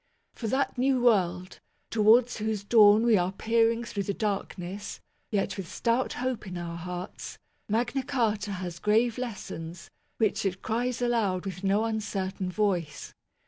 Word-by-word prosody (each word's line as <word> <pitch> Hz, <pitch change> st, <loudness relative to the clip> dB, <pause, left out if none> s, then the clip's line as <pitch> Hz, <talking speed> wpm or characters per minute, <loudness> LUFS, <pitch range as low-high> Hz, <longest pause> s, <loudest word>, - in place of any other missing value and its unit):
For 230 Hz, -, -5 dB
that 260 Hz, +2 st, 0 dB
new 260 Hz, 0 st, +3 dB
world, 185 Hz, -6 st, +1 dB, 0.3 s
towards 230 Hz, +3 st, +4 dB
whose 215 Hz, -2 st, -2 dB
dawn 210 Hz, 0 st, +6 dB
we 235 Hz, -3 st, +5 dB
are 180 Hz, +1 st, 0 dB
peering 230 Hz, +3 st, +2 dB
through 230 Hz, -4 st, -4 dB
the 200 Hz, 0 st, -2 dB
darkness, 200 Hz, -2 st, -4 dB, 0.3 s
yet 200 Hz, -2 st, -1 dB
with 190 Hz, -2 st, -6 dB
stout 235 Hz, +5 st, 0 dB
hope 255 Hz, -4 st, -3 dB
in 180 Hz, -1 st, -5 dB
our 170 Hz, -1 st, -5 dB
hearts, 180 Hz, +1 st, -6 dB, 0.3 s
Magna 240 Hz, +5 st, 0 dB
Carta 220 Hz, -6 st, -1 dB
has 180 Hz, -2 st, -5 dB
grave 225 Hz, +4 st, +2 dB
lessons, 175 Hz, -8 st, -6 dB, 0.3 s
which 220 Hz, -3 st, +1 dB
it 190 Hz, -1 st, -2 dB
cries 245 Hz, +2 st, -1 dB
aloud 210 Hz, -6 st, +1 dB
with 190 Hz, 0 st, -6 dB
no 200 Hz, +2 st, +2 dB
uncertain 195 Hz, -4 st, -2 dB
voice. 180 Hz, -7 st, -1 dB
210 Hz, 145 wpm, -28 LUFS, 185-230 Hz, 0.3 s, dawn